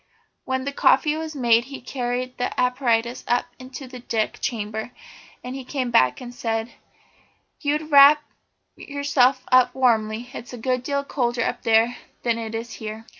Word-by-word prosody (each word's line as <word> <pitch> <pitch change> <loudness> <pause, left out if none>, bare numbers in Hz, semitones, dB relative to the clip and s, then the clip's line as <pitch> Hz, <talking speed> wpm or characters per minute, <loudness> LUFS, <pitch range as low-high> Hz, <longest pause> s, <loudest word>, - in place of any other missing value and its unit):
When 260 0 -2
the 280 - -2
coffee 295 +2 +3
was 315 -1 -5
made 235 -3 +3
he 275 +1 -8
carried 250 0 -4
the 245 - -2
apparatus 250 -1 +1
up 245 0 +1
into 260 +1 -9
the 255 0 -10
deck 225 -3 -2
chamber. 220 -1 -3 0.5
Then 250 - -6
he 265 0 -6
came 255 -1 -3
back 130 - +3
and 245 -1 -9
said: 225 -1 -3 0.9
"You'd 295 +1 0
better 310 0 -11
wrap 285 +1 +8 0.5
yourself 280 -3 +1
up 250 -1 +5
warmly. 230 -2 +1
It's 245 - -8
a - - -6
good 255 +2 -1
deal 280 +2 -2
colder 240 -4 -1
up - - -2
there 225 +2 +3 0.3
than 235 -1 0
it 225 0 -5
is 230 +1 -5
here." 220 0 -7
250 Hz, 170 wpm, -23 LUFS, 230-270 Hz, 0.9 s, wrap